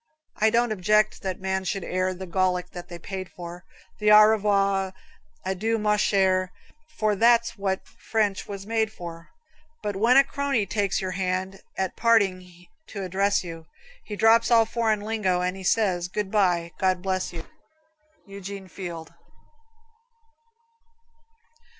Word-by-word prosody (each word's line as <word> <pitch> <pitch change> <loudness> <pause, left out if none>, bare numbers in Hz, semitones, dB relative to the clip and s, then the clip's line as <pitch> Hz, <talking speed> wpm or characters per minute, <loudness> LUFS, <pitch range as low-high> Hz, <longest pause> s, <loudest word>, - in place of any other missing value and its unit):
I 220 - +4
don't 235 +1 +2
object 210 +1 +2
that 190 -1 -4
men 190 0 -2
should 195 0 -3
air 185 +1 -1
The 185 +1 -7
Gallic 180 0 0
they 175 - -6
have 170 -1 -9
paid 190 -2 -5
for, 175 +1 -9 0.3
With 210 0 +2
"Au 210 0 +9
revoir," 200 -3 +2 0.5
"Adieu, 210 +5 0
ma 210 -1 +2
chere," 190 -3 +2 0.5
For 215 -1 +1
that's 235 +2 +3
what 195 -2 -2
French 210 -3 -2
was 200 -1 -7
made 220 0 0
for. 165 -4 -9 0.5
But 205 -1 -2
when 230 +6 +4
a 275 - +8
crony 275 -5 -1
takes 200 -1 -1
your 185 -1 -3
hand 185 +1 -2 0.2
At 190 -1 -2
parting 185 -6 +1 0.2
to 200 -2 -6
address 195 +2 +1
you, 165 -2 -9 0.4
He 210 - -6
drops 225 +2 +4
all 230 -2 +5
foreign 220 -2 0
lingo 205 -4 0
and 180 +1 -1
He 195 - -9
says, 185 -3 +1
"Good 195 +1 -4
bye, 175 -5 +2
God 185 -1 +1
bless 185 -1 -1
you." 165 -2 -8 0.8
Eugene 195 -1 -8
Field. 170 -3 -7
195 Hz, 145 wpm, -25 LUFS, 185-215 Hz, 0.8 s, Au